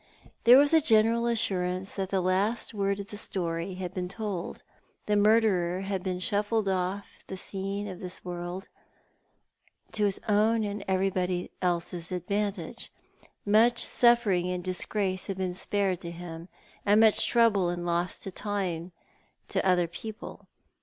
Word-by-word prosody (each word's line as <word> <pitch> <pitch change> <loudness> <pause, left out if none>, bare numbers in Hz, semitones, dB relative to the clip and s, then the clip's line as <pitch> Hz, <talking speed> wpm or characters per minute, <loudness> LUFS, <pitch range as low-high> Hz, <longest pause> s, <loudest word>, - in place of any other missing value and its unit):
There 245 +2 +9
was 285 +2 +5
a 320 - +6
general 230 -2 +3
assurance 185 -4 -1
that 190 -2 -3
the 195 -1 +1
last 195 +7 0
word 200 -1 -1
of 200 0 -7
the 205 - -5
story 175 -2 -2
had 185 -1 -5
been 180 -2 -3
told. 195 -3 -5 0.4
The 210 - +1
murderer 205 -4 +3
had 195 -1 -3
been 185 -1 -2
shuffled 205 +3 0
oflf 190 +1 -1 0.2
the 190 - -6
scene 195 +2 -3
of 185 -3 -7
this 180 -1 -6
world, 175 +1 -5 1.2
to 210 -1 +1
his 200 -1 0
own 220 +2 +3
and 205 -1 -4
everybody 185 -1 0
else's 175 -1 -1
advantage. 200 +2 -3 0.5
Much 225 +3 +4
suffering 225 -9 +3
and 180 -1 -3
disgrace 185 +1 -1
had 195 - -4
been 185 -1 -2
spared 195 -1 -1
to 170 - -5
him, 170 0 -8 0.3
and 205 +1 +4
much 220 -1 +5
trouble 220 -7 +3
and 175 0 -3
loss 175 +1 -1
of 195 - -6
time 185 -5 -3 0.6
to - - 0
other 180 -2 +3
people. 210 +6 -9
195 Hz, 150 wpm, -28 LUFS, 180-210 Hz, 1.2 s, There